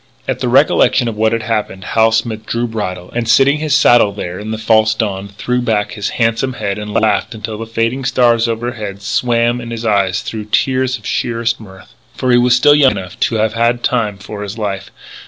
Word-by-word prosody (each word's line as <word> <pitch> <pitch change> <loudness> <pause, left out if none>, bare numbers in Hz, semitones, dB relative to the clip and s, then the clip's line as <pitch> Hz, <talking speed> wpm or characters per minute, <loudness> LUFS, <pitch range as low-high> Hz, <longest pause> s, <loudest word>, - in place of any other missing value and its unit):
At - - -2
the - - -1
recollection 120 - +3
of 115 - -3
what 110 +1 +1
had 115 -1 -1
happened, 105 -4 -3
Hal 115 +2 +2
Smith 110 -1 -2
drew 120 +1 -1
bridle, 95 -6 -5
and, 115 -1 -3
sitting 135 +5 +4
his 155 -1 +1
saddle 120 -7 +5
there 90 -3 -6
in 105 +1 -7
the 110 - -3
false 110 0 +2
dawn, 100 -3 -3
threw 125 +5 -2
back 110 -4 0
his 105 -2 -3
handsome 115 +3 0
head 100 -3 -3
and 105 0 -6
laughed 110 +2 0
until 110 0 -6
the 115 - -6
fading 115 +4 -1
stars 120 -3 +3
overhead 110 -4 -4
swam 120 +3 0
in 120 - -8
his 115 0 -5
eyes 100 -4 +1
through 110 -2 -6
tears 130 +4 0
of - - -18
sheerest 115 0 -1
mirth. 95 -4 -14 0.2
For 130 - 0
he 120 - +5
was 120 0 +4
still 145 +4 +5
young 140 -4 +5
enough 90 -1 -8
to 115 - -3
have 110 0 +1
had 115 +1 +1
the 120 - -22
time 110 -5 -1
of 105 - -7
his 105 +2 -6
life. 100 -2 -4
115 Hz, 215 wpm, -16 LUFS, 105-120 Hz, 0.2 s, saddle